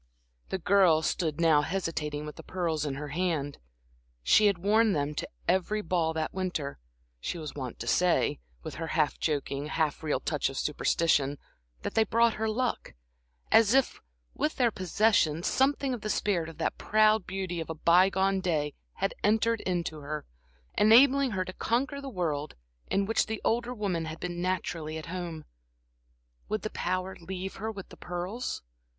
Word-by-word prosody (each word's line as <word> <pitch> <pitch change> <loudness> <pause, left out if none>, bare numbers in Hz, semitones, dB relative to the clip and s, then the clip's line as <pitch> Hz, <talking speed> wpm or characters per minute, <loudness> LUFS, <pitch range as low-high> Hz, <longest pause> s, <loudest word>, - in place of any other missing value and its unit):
The - - -1
girl 180 -4 +4
stood 160 -2 -1
now 160 -3 +5
hesitating 155 -3 -3
with 150 - -7
the - - -9
pearls 165 -5 -2
in 135 - -3
her 145 +1 -6
hand. 155 -3 -1 0.6
She 210 - +6
had 200 -3 +2
worn 210 +4 +3
them 145 -1 -1
to - - -4 0.2
every 210 +3 +1
ball 165 -2 +1
that 160 -1 -2
winter, 180 -7 -3 0.4
she 175 - -4
was 155 -3 -6
wont 130 -4 -6
to - - -6
say, 175 - +2 0.2
with - - -6
her 165 - -2
half 155 -2 +1
joking, 145 -2 -1
half 155 -1 -1
real 150 -4 0
touch 150 0 -1
of 135 - -7
superstition, 145 -2 +1 0.5
that - - -3
they 225 - +4
brought 230 +1 +3
her 220 - +1
luck; 245 +2 -2 0.6
as 225 +2 +6
if, 270 -2 +2 0.3
with 305 - -1
their 240 -3 +3
possession, 185 -4 +2
something 270 +2 +2
of 240 - -5
the 215 - -4
spirit 175 -7 0
of 160 - -12
that 165 - -2
proud 215 -1 +3
beauty 190 -2 -3
of 160 - -5
a 160 - -3
by 175 +4 +5
gone 195 0 +1
day 155 -5 0 0.2
had 195 +1 -1
entered 225 +2 +2
into 170 -4 -2
her, 150 +1 -5 0.5
enabling 260 +6 +6
her 185 -4 -2
to 185 - -7
conquer 275 +8 -1
the 275 - -6
world 155 - -2 0.3
in 195 0 +1
which 225 +3 +1
the 220 0 -3
older 235 +2 +1
woman 195 -8 -2
had 160 0 -6
been 175 -1 -4
naturally 170 -4 -2
at 155 - -7
home. 170 -4 -5 1.0
Would 215 - -2
the 215 - -3
power 185 +1 -2
leave 190 +2 -5
her 220 +2 -3
with 195 -3 -9
the - - -13
pearls? 180 - -4
180 Hz, 175 wpm, -29 LUFS, 155-215 Hz, 1.0 s, She